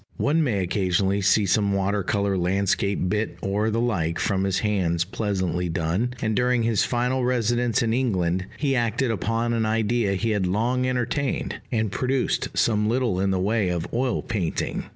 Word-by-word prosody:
One 160 Hz, +3 st, +2 dB
may 105 Hz, -9 st, 0 dB
occasionally 95 Hz, +1 st, 0 dB
see 100 Hz, +2 st, +3 dB
some 100 Hz, +1 st, +2 dB
water 100 Hz, +1 st, 0 dB
color 100 Hz, +1 st, 0 dB
landscape 95 Hz, +1 st, 0 dB
bit 105 Hz, +4 st, -1 dB
or 105 Hz, +3 st, 0 dB
the 115 Hz, +1 st, 0 dB
like 85 Hz, -9 st, 0 dB
from 95 Hz, +2 st, 0 dB
his 95 Hz, -1 st, 0 dB
hands 90 Hz, -6 st, 0 dB
pleasantly 95 Hz, -3 st, -2 dB
done; 90 Hz, +10 st, -1 dB
and 110 Hz, -1 st, 0 dB
during 125 Hz, 0 st, +2 dB
his 115 Hz, -3 st, +2 dB
final 125 Hz, +1 st, 0 dB
residence 120 Hz, -1 st, +1 dB
in 115 Hz, -1 st, 0 dB
England 95 Hz, -7 st, 0 dB
he 140 Hz, -2 st, 0 dB
acted 120 Hz, +1 st, 0 dB
upon 115 Hz, +2 st, -1 dB
an 115 Hz, -2 st, 0 dB
idea 110 Hz, -1 st, +1 dB
he 110 Hz, +4 st, -1 dB
had 100 Hz, -3 st, 0 dB
long 120 Hz, +7 st, 0 dB
entertained, 130 Hz, +2 st, -1 dB
and 110 Hz, -4 st, 0 dB
produced 130 Hz, +4 st, 0 dB
some 105 Hz, -2 st, +2 dB
little 120 Hz, -6 st, 0 dB
in 100 Hz, +1 st, +1 dB
the 95 Hz, -1 st, 0 dB
way 105 Hz, 0 st, +1 dB
of 85 Hz, -2 st, -2 dB
oil 125 Hz, +1 st, 0 dB
painting. 95 Hz, -8 st, -2 dB
105 Hz, 175 wpm, -24 LUFS, 95-120 Hz, -, see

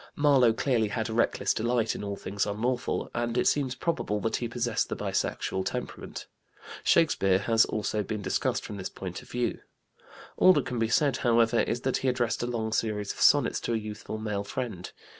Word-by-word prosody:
Marlowe 140 Hz, -5 st, +5 dB
clearly 115 Hz, -1 st, +1 dB
had 110 Hz, +2 st, -3 dB
a -, -, -3 dB
reckless 115 Hz, -, +1 dB
delight 115 Hz, 0 st, 0 dB
in -, -, -6 dB
all 100 Hz, 0 st, -3 dB
things 100 Hz, +1 st, -2 dB
unlawful, 120 Hz, +5 st, -2 dB
and 120 Hz, 0 st, -1 dB
it -, -, +2 dB
seems 135 Hz, -3 st, +1 dB
probable 125 Hz, -8 st, -1 dB
that 110 Hz, +2 st, -1 dB
he 120 Hz, -, -3 dB
possessed 120 Hz, -1 st, -1 dB
the -, -, -2 dB
bisexual 95 Hz, -, -2 dB
temperament. -, -, -5 dB, 0.6 s
Shakespeare 95 Hz, -, +3 dB
has 115 Hz, +3 st, +3 dB
also 105 Hz, 0 st, -2 dB
been 105 Hz, 0 st, -4 dB
discussed -, -, -1 dB
from 105 Hz, -, -6 dB
this 95 Hz, -, -4 dB
point 90 Hz, -2 st, -7 dB
of -, -, -17 dB
view. 125 Hz, 0 st, -1 dB, 0.8 s
All 185 Hz, -, +7 dB
that -, -, +1 dB
can 125 Hz, -2 st, -3 dB
be 115 Hz, -, +2 dB
said, 140 Hz, +3 st, +2 dB
however, 115 Hz, -2 st, +3 dB
is 120 Hz, +1 st, 0 dB
that 130 Hz, -, 0 dB
he 135 Hz, -, -2 dB
addressed 125 Hz, -2 st, 0 dB
a 120 Hz, -, -1 dB
long 110 Hz, -2 st, -2 dB
series 105 Hz, -3 st, -1 dB
of -, -, -9 dB
sonnets -, -, +4 dB
to 120 Hz, -, -2 dB
a -, -, +2 dB
youthful 105 Hz, 0 st, -6 dB
male 105 Hz, -2 st, -3 dB
friend. 105 Hz, -5 st, -5 dB
115 Hz, 195 wpm, -28 LUFS, 105-125 Hz, 0.8 s, All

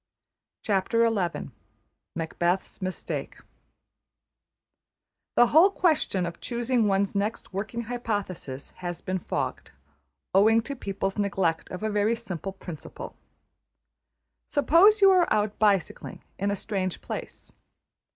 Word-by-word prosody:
\chapter{Macbeth's 180 Hz, -, -2 dB
Mistake} 185 Hz, 0 st, -4 dB, 2.0 s
The 240 Hz, -, +7 dB
whole 335 Hz, +6 st, +8 dB
question 310 Hz, -, +1 dB
of 170 Hz, 0 st, -7 dB
choosing 240 Hz, -1 st, 0 dB
one's 195 Hz, 0 st, +1 dB
next 200 Hz, 0 st, -2 dB
working 220 Hz, +5 st, -3 dB
hypothesis 205 Hz, -, -4 dB
has 175 Hz, -1 st, -5 dB
been 185 Hz, 0 st, -2 dB
fogged, -, -, -3 dB, 0.6 s
owing 220 Hz, +4 st, +5 dB
to 280 Hz, +3 st, -5 dB
people's 195 Hz, -3 st, -3 dB
neglect 190 Hz, -5 st, 0 dB
of 185 Hz, +3 st, -6 dB
a 220 Hz, -, 0 dB
very 210 Hz, +2 st, +2 dB
simple 195 Hz, -5 st, -5 dB
principle. 190 Hz, -, -9 dB, 1.3 s
Suppose 370 Hz, +9 st, +5 dB
you 390 Hz, -1 st, +8 dB
are 365 Hz, -2 st, +4 dB
out 210 Hz, -1 st, +1 dB
bicycling 200 Hz, -5 st, 0 dB, 0.2 s
in 200 Hz, +1 st, 0 dB
a 200 Hz, -, 0 dB
strange 190 Hz, -3 st, -3 dB
place. -, -, -7 dB
200 Hz, 105 wpm, -27 LUFS, 185-235 Hz, 2.0 s, whole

